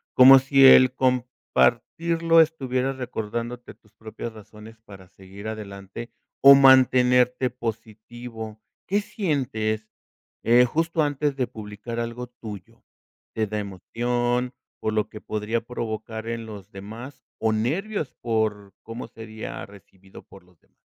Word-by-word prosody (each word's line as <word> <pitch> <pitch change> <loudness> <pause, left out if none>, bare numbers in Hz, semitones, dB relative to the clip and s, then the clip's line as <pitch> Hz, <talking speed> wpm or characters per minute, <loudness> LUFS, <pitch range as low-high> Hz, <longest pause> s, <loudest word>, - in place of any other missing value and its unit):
Como 135 +1 +9
si 135 0 +4
el 130 -1 +8
compartirlo 160 - +2
estuviera 135 -4 0
recordándote 120 -1 -5
tus 105 0 -29
propias 110 +1 -8
razones 110 +1 -14
para 95 -2 -13
seguir 95 +3 -12
adelante 105 +1 -8 0.3
o 140 0 +10
mantenerte 125 -2 +5
positivo. 115 -1 -7 0.3
¿Qué 200 +2 +2
sientes, 115 - -2 0.6
eh, 120 +2 +5
justo 165 +4 0
antes 145 -1 -1
de 130 -2 0
publicar 110 +2 -8
algo 120 +1 -4
tuyo? 110 -6 -11 0.5
¿Te 110 -1 0
da 105 +1 -3
emoción 120 +5 -2 0.2
por 110 - -2
lo 105 -1 0
que 105 - -10
podría 110 +2 -2
provocar 110 -1 -6
en 115 -1 -4
los 105 -2 -10
demás 110 +8 -10 0.2
o 110 -1 +1
nervios 155 - -2
por 110 -4 -2
cómo 115 +1 -8
sería 110 -1 -8
recibido 95 -1 -16
por 95 - -17
los 90 -2 -27
demás? - - -38
115 Hz, 125 wpm, -24 LUFS, 110-130 Hz, 0.6 s, o